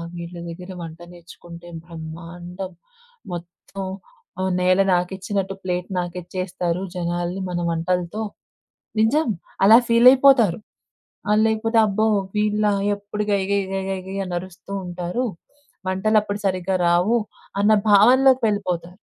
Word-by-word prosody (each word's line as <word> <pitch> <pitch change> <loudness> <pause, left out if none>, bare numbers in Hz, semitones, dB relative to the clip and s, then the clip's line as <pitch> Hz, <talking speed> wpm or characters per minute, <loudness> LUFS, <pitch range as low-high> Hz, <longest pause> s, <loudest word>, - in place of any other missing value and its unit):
వీళ్ళ 170 0 -7
దగ్గర 180 +3 -8
వంట 165 0 -8
నేర్చుకుంటే 170 0 -13 0.2
బ్రహ్మాండం. 175 +3 -8 0.6
మొత్తం 175 +3 -7 0.6
ఆహ్, 190 0 0
నేల 185 +1 +4
నాకిచ్చినట్టు 190 +2 -1
ప్లేట్ 180 -1 -2
నాకిచ్చేస్తారు 180 0 -3
జనాల్ని 175 +1 -2
మన 175 -1 -2
వంటలతో 175 +4 -1 0.8
నిజం 285 +9 +3 0.4
అలా 220 +3 +9
ఫీలయిపోతారు. 245 -4 +6 0.7
ఆహ్, 210 +1 +4
లేకపోతే, 225 +1 +1
అబ్బో! 215 +2 +1 0.3
వీళ్ళు 210 0 +2 0.2
ఎప్పుడు 205 +1 -4
గై 200 -1 +2
గై 200 - +3
గై 195 0 -1
గై 190 -1 -2
గై 195 - -5
అని 180 -1 -5
అరుస్తూ 185 +1 -11
ఉంటారు 180 +6 -3 0.6
వంటలప్పుడు 205 +2 +1
సరిగ్గా 185 0 0
రావు, 175 +7 +3 0.4
అన్న 210 +2 +4 0.2
భావనలోకి 255 +5 +6
వెళ్ళిపోతారు. 180 -3 -3
185 Hz, 115 wpm, -22 LUFS, 175-210 Hz, 0.8 s, అలా